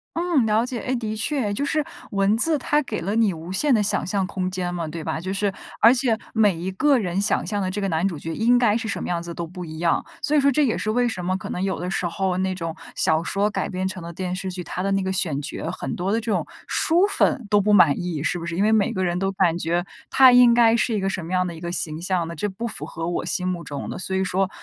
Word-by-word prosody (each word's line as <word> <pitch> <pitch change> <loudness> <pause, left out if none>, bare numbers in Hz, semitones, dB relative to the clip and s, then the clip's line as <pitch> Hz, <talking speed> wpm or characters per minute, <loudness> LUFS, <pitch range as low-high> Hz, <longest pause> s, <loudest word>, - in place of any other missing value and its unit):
嗯， 335 -8 +2
了 220 +2 +2
解。 250 -2 -4
哎， 260 - -2
的 220 -2 -3
确， 220 -2 -1
就 280 - -2
是 300 +1 0 0.3
文 200 +1 +2
字 310 +4 +3
它 295 +3 +1
给 225 -6 -4
了 200 +5 -2
你 220 -5 +3
无 165 +2 -9
限 260 +9 +2
的 215 - +3
想 205 - 0
象 190 0 -1
空 185 -1 -3
间 180 -1 -3
嘛， 170 -2 -3
对 160 +1 -6
吧？ 160 - -3
就 190 +1 -4
是 195 0 0 0.3
而 230 +3 +7
且 245 -4 +1 0.2
每 210 -4 +4
一 175 +3 -4
个 280 +7 +3
人 185 -1 -1
想 205 - +1
象 205 -2 -1
的 185 0 -1
这 205 - -3
个 195 - -1
男 165 +1 0
主 170 -7 -2
角 165 +1 -5
应 240 +2 +4
该 220 -3 +3
是 225 -1 -2
什 - - -3
么 - - -4
样 170 -1 -2
子 170 -1 -6
都 170 -1 -5
不 180 +1 -8
一 160 -1 -8
样， 165 0 +1 0.2
所 300 - +1
以 - - +6
说 280 0 +4
这 295 +2 +3
也 225 - 0
是 215 - -2
为 245 +1 +2
什 180 -6 -4
么 185 +1 0
可 - - -8
能 180 - -3
有 190 -3 -1
的 180 +1 -3
时 185 - -1
候 185 +1 -1
那 190 0 0
种 165 -3 -5 0.2
小 160 +1 +1
说 200 +3 0
改 - - -2
编 185 0 -2
成 185 -2 -6
的 170 - -6
电 180 +1 -4
视 190 0 -4
剧， 180 0 -6
它 185 - -4
的 195 - 0
那 195 0 +1
个 190 0 -2
选 155 -6 0
角， 165 +2 -5
很 - - -5
多 185 +3 -2
的 225 - +2
这 230 0 -5
种 - - 0 0.2
书 350 +5 +3
粉 260 - +1
都 205 -1 +4
不 210 +1 +1
满 170 -8 +6
意， 175 -5 -3
是 175 +2 0
不 170 - -6
是？ 170 0 -4
因 200 - +2
为 215 - +3
每 210 -2 +3
个 185 -1 -1
人 175 0 0
都 195 +1 0
感 180 -3 +1
觉 175 +2 -1 0.2
他 260 -2 +7
应 245 -1 +7
该 230 -1 +5
是 235 0 +1
一 210 - 0
个 195 - -1
什 185 -3 -3
么 175 - -8
样 185 0 +1
的 170 - -6
一 160 - -11
个 175 0 -4
形 160 -2 -2
象 180 -2 0
的， 170 - -6
这 205 +7 -2
不 230 +5 -5
符 - - -6
合 165 0 -5
我 175 - -2
心 180 -1 -1
目 175 -2 -2
中 145 -1 -6
的。 - - -5
所 190 0 -2
以 190 0 +1
说， 190 +1 0
190 Hz, 320 characters per minute, -23 LUFS, 175-220 Hz, 0.3 s, 而